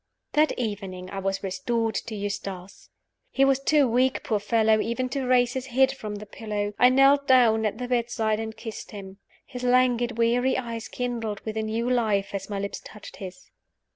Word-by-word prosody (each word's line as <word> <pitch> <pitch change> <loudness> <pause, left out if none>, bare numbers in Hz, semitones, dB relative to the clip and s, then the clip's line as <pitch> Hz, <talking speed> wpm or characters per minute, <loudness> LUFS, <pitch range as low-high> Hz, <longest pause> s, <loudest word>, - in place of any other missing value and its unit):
That 305 +1 +3
evening 195 -5 -4
I 195 - -4
was 195 +1 -2
restored 225 +4 -1
to 225 - -4
Eustace. 195 -2 -6 0.4
He 270 - +3
was 275 -1 +3
too 285 0 +3
weak, 255 +3 +1
poor 215 -2 0
fellow, 220 +1 +3
even 245 +3 -1
to 265 -1 -2
raise 250 -1 +3
his 260 -1 -4
head 265 +1 +3
from 215 -5 -6
the 210 +1 -8
pillow. 210 -1 -4
I 250 - +7
knelt 275 +2 +4
down 225 -4 +5
at 210 - -4
the 250 - -4
bedside 230 -3 0
and 220 -1 -5
kissed 225 -1 -7
him. 195 -2 -9 0.3
His 250 -2 -8
languid, 245 -1 +2
weary 240 +3 +2
eyes 230 -3 -5
kindled 230 -4 -3
with 220 -1 -5
a 220 - 0
new 220 +2 -2
life 215 -6 +1
as 195 0 -4
my 205 - -3
lips 200 0 -4
touched 210 - -11
his. 190 +6 -10
230 Hz, 190 wpm, -26 LUFS, 205-250 Hz, 0.4 s, I